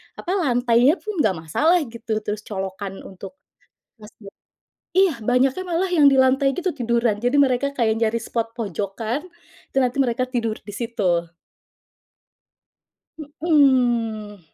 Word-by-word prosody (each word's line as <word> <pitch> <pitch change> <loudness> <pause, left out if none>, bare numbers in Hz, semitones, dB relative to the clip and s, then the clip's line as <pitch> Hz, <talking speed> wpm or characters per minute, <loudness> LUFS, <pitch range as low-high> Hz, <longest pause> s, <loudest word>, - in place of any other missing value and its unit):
apa, 360 - -5
lantainya 245 0 +3
pun 425 -5 -4
nggak 210 -9 +2
masalah 170 - +2
gitu, 225 -2 -4
terus 210 0 -3
colokan 195 -1 -5
untuk 195 +4 -11 0.7
masjid 210 -1 -14 0.6
iya, 375 -4 +3
banyaknya 260 +8 +2
malah 355 +1 -1
yang 335 -5 +3
di 270 -2 +6
lantai 270 +1 +3
gitu 365 +3 -2
tiduran, 235 -3 +1
jadi 245 +6 0
mereka 275 +1 +2
kayak 225 -5 +1
nyari 230 0 0
spot 230 0 -3
pojokan, 220 - -4 0.5
itu - - -18
nanti 250 +1 0
mereka 255 +1 -1
tidur 230 -4 -2
di 205 - -11
situ. 185 -8 -1 2.1
Mhm. 240 - +2
235 Hz, 130 wpm, -22 LUFS, 215-275 Hz, 2.1 s, di